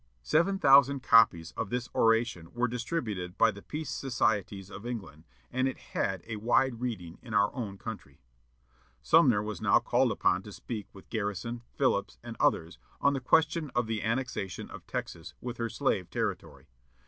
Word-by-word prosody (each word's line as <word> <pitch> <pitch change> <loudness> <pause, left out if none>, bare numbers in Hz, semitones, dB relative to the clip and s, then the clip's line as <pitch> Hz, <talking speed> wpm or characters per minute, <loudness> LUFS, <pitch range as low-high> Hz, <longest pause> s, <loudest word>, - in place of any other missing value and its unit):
'" - - -40
Seven 170 - +2
thousand 140 -3 +5
copies 85 -10 +5
of 100 - -4
this 120 +1 -2
oration 115 -7 +2
were 120 +1 +1
distributed 115 - -3
by 115 -1 +5
the 100 0 -11
Peace 150 +5 -5
Societies 105 -6 -1
of 100 - -9
England, 100 -10 -6 0.3
and 130 +1 +1
it 130 - -3
had 95 -3 -3
a 110 -1 -5
wide 120 +2 +2
reading 90 -9 -4
in 115 -4 -6
our 105 -3 +3
own 105 -6 -5
country. 100 -11 -8 0.8
Sumner 115 - +5
was 105 -3 -5
now - - +5
called - - +2
upon 90 - +2
to 105 - -11
speak 105 0 -6
with 95 - -16
Garrison, 110 +2 -3
Phillips, - - +1
and - - -7
others, 80 +2 +1 0.2
on 140 - +3
the 135 - -2
question 160 +3 +2
of 120 -1 +2
the 110 -1 -2
annexation 115 -5 -3
of - - -11
Texas 80 0 -5
with 120 -1 -6
her 115 -1 -2
slave 110 -9 -1
territory. 70 +2 -4
115 Hz, 170 wpm, -30 LUFS, 95-125 Hz, 0.8 s, thousand